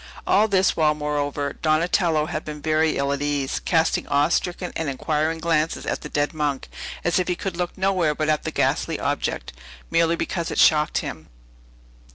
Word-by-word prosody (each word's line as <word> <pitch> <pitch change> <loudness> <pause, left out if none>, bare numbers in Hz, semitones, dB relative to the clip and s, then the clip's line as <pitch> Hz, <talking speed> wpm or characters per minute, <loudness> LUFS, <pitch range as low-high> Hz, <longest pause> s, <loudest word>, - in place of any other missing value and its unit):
All 210 +3 +4
this 190 -3 +2
while, 155 -2 +3
moreover, 145 -1 -2
Donatello 160 0 +2
had 155 -1 -4
been 150 -1 -7
very 155 +1 +1
ill 140 0 0
at 140 - -4
ease, 145 -2 -1
casting 165 -2 +1
awe 145 +2 +2
stricken 180 +1 -1
and 160 -3 -2
inquiring 155 +4 -1
glances 165 -1 0
at - - -2
the 150 - -7
dead 145 0 0
monk; 145 -3 -2 0.3
as 175 +1 +2
if 180 - -1
he 180 - 0
could 190 0 -4
look 175 0 -3
nowhere 185 -5 +1
but 155 0 -1
at 155 -1 +2
that - - -5
ghastly - - 0
object, - - -2 0.4
merely 165 0 +3
because 170 0 -3
it - - -4
shocked 150 -1 +4
him. 80 0 -7
155 Hz, 185 wpm, -23 LUFS, 150-170 Hz, 0.4 s, All